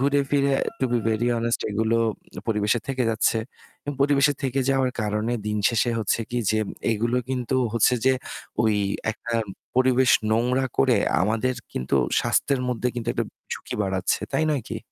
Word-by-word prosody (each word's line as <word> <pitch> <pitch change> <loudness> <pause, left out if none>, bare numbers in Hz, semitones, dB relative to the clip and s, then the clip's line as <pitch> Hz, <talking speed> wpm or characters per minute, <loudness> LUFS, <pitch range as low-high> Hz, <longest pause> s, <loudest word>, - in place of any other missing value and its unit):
ঘুরে 140 +1 +3
ফিরে 140 -1 +2 0.3
to - - 0
be 120 - +3
very 110 +2 0
honest 115 0 0
এগুলো 110 +2 +1 0.5
পরিবেশে 105 +2 +1
থেকে 130 -1 0
যাচ্ছে। 110 0 +2 0.5
এবং 145 - -3
পরিবেশে 140 0 +4
থেকে 135 0 0
যাওয়ার 130 -1 +2
কারণে 105 +2 -1 0.2
দিনশেষে 105 +3 +1
হচ্ছে 110 +1 0
কি 120 - -1
যে 110 - +2 0.3
এইগুলো 115 +2 0
কিন্তু 130 0 -1 0.2
হচ্ছে 115 +2 +4
যে 130 - +6 0.5
ওই 110 -1 +3 0.4
একটা 115 +2 -6 0.4
পরিবেশ 130 0 +4 0.2
নোংরা 125 +4 +2
করে 70 - +4 0.3
আমাদের 115 +6 +1 0.2
কিন্তু 65 - -2 0.3
স্বাস্থ্যের 140 -3 +1
মধ্যে 125 0 0
কিন্তু 120 -1 -4
একটা - - -1 0.3
ঝুঁকি - - -5
বাড়াচ্ছে, 95 -1 0
তাই 155 - +2
নয় 140 -5 -1
কি? - - -4
120 Hz, 155 wpm, -24 LUFS, 110-130 Hz, 0.5 s, যে